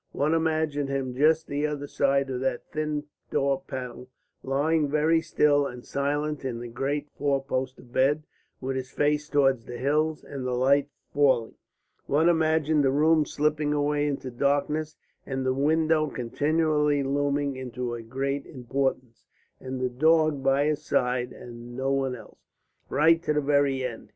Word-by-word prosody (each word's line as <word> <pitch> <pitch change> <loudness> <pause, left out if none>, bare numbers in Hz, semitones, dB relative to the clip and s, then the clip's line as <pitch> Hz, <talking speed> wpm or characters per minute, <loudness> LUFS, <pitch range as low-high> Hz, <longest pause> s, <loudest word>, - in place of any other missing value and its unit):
One 150 +3 +1
imagined 155 -3 0
him 135 -2 -2
just 155 +3 +3
the 145 +2 -1
other 145 -1 -4
side 140 -1 +1
of 125 - -2
that 130 -2 -1
thin 150 -1 -2 0.3
door 135 -1 +1
panel, 125 -1 -6 0.3
lying 145 +3 +1
very 155 +3 +3
still 145 -3 +2
and 125 -1 -9
silent 145 +1 -2
in 130 -3 -3
the 120 +1 -6
great 140 +4 -3
four 140 -1 0
poster 130 -1 -3
bed 135 +5 +1 0.4
with 135 0 -3
his 130 -1 -5
face 150 +2 0
towards 135 -5 +2
the 120 - -7
hills, 150 +4 0
and 135 -2 -7
the 125 -1 -1
light 140 +3 +3 0.2
falling. 135 -6 +2 0.5
One 160 +4 +3
imagined 160 -2 +2
the 135 - +3
room 155 +2 +3
slipping 150 0 0
away 145 0 +1
into 135 -3 -3
darkness, 145 +4 0 0.3
and 135 -1 -3
the 130 - +2
windows 155 +2 +2
continually 150 +3 +1
looming 140 0 0
into 125 -1 -4
a 120 - -5
greater 135 +4 -3
importance, 130 -2 -3 0.3
and 130 0 -5
the 130 0 0
dog 155 +2 +3
by 135 +1 +2
his 150 -1 -1
side 125 0 0
and 120 0 -10
no 135 +1 0
one 135 -2 0
else, 120 - -14 0.5
right 165 +4 +4
to 155 - 0
the 150 - +2
very 140 -2 +2
end. 120 -3 -7
140 Hz, 160 wpm, -26 LUFS, 130-150 Hz, 0.5 s, right